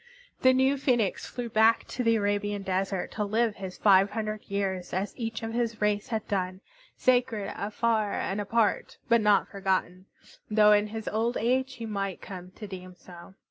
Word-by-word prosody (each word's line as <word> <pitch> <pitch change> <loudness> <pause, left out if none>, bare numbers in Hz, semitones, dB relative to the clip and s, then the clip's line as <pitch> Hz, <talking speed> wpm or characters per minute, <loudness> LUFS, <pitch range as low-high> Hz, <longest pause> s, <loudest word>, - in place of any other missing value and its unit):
The 260 - +6
new 265 +2 +2
Phoenix 240 -8 +1
flew 245 -1 -5
back 225 0 +4
to 250 - -3
the 230 -1 +3
Arabian 205 -1 -1
desert 190 0 -2
to 210 - -2
live 220 +1 0
his 190 -2 -7
five 195 -1 +5
hundred 215 -1 -4
years 195 -2 -2
as 190 +3 -2
each 225 -2 -4
of 225 0 -4
his 230 -2 -1
race 210 -1 0
had 220 -2 -3
done, 185 -1 -2 0.4
sacred, 245 -5 +1
afar, 215 0 0
and 200 +2 -2
apart, 215 +1 0
but 235 -1 +5
not 210 -2 +4
forgotten, 190 -1 -2 0.4
though 210 -1 +5
in 210 0 +4
his 220 0 -7
old 230 +3 0
age 260 +3 0
he 230 - -6
might 195 -3 -3
come 180 -2 -9
to 215 - -8
deem 185 -2 -9
so. 175 +1 -14
210 Hz, 180 wpm, -28 LUFS, 195-230 Hz, 0.4 s, The